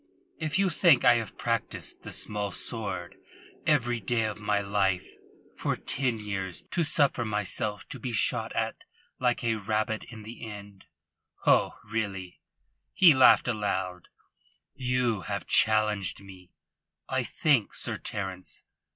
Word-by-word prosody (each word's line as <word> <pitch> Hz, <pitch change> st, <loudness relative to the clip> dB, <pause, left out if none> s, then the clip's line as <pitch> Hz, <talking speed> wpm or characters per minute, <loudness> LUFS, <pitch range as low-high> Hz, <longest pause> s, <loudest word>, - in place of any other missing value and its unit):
"If 155 Hz, +1 st, -1 dB
you 195 Hz, -1 st, +3 dB
think 165 Hz, -6 st, +5 dB
I 125 Hz, -, +8 dB
have 115 Hz, -4 st, -5 dB
practised -, -, -2 dB
the -, -, -8 dB
small 105 Hz, -1 st, -2 dB
sword 95 Hz, -4 st, -4 dB, 0.5 s
every 120 Hz, -6 st, +2 dB
day 115 Hz, +2 st, 0 dB
of 105 Hz, -1 st, -4 dB
my 105 Hz, -1 st, +1 dB
life 100 Hz, -2 st, 0 dB, 0.5 s
for -, -, -1 dB
ten 125 Hz, -4 st, -1 dB
years 95 Hz, -4 st, -4 dB
to 175 Hz, -, +1 dB
suffer 145 Hz, -5 st, +2 dB
myself 105 Hz, -1 st, -1 dB
to -, -, -7 dB
be 125 Hz, -, -4 dB
shot 110 Hz, -, +1 dB
at -, -, -2 dB, 0.4 s
like 125 Hz, -1 st, +1 dB
a 115 Hz, -1 st, +1 dB
rabbit 110 Hz, +2 st, -1 dB
in 110 Hz, -3 st, -10 dB
the 115 Hz, +3 st, -10 dB
end 100 Hz, -2 st, -10 dB, 0.6 s
ho, -, -, +3 dB
really!" 100 Hz, -4 st, -4 dB, 0.5 s
He 175 Hz, -5 st, +8 dB
laughed 130 Hz, -1 st, +6 dB
aloud. 95 Hz, -6 st, -2 dB, 0.7 s
"You 125 Hz, -4 st, 0 dB
have -, -, -3 dB
challenged 105 Hz, -3 st, +2 dB
me, 95 Hz, -2 st, -14 dB, 0.6 s
I 130 Hz, -1 st, 0 dB
think, 130 Hz, -3 st, +1 dB
Sir -, -, -2 dB
Terence. 95 Hz, -2 st, -5 dB
110 Hz, 135 wpm, -28 LUFS, 100-120 Hz, 0.7 s, I